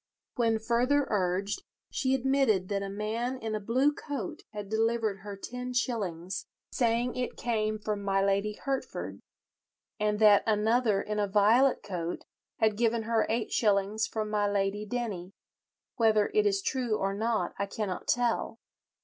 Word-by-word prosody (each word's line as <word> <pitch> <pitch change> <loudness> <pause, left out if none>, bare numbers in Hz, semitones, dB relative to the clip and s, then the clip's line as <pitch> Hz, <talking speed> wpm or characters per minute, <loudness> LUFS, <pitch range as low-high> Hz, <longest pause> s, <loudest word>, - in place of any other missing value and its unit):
When 230 -2 +2
further 245 +6 +2
urged, 195 - 0 0.3
she 265 0 +1
admitted 265 -8 +2
that 200 -1 0
a 200 - -4
man 220 +5 -2
in 225 -3 -4
a 215 - -1
blue 255 +8 +2
coat 280 -10 -5
had 210 -2 -6
delivered 220 -1 0
her 200 0 -8
ten 250 +4 -6
shillings, 195 -8 -2 0.2
saying 240 0 +1
it 250 -1 -3
came 215 -2 0
from 210 -1 -3
my 195 -1 +1
Lady 200 +2 +1
Hertford, 270 +4 -4 0.8
and 210 0 +1
that 210 -1 +7
another 220 0 +2
in 210 0 -2
a 205 - +1
violet 220 +7 +4
coat 175 -3 -4 0.3
had 220 -2 +2
given 230 0 +1
her 225 0 +1
eight 225 0 -1
shillings 210 +1 +2
from 215 -1 -3
my 205 -1 +2
Lady 200 +1 0
Denny—"whether 215 0 -2
it 425 0 +4
is 395 -1 +1
true 245 - 0
or 195 0 -1
not 215 -3 -1
I 200 - 0
cannot 200 -3 -4
tell." 245 -5 +1
215 Hz, 150 wpm, -29 LUFS, 200-240 Hz, 0.8 s, that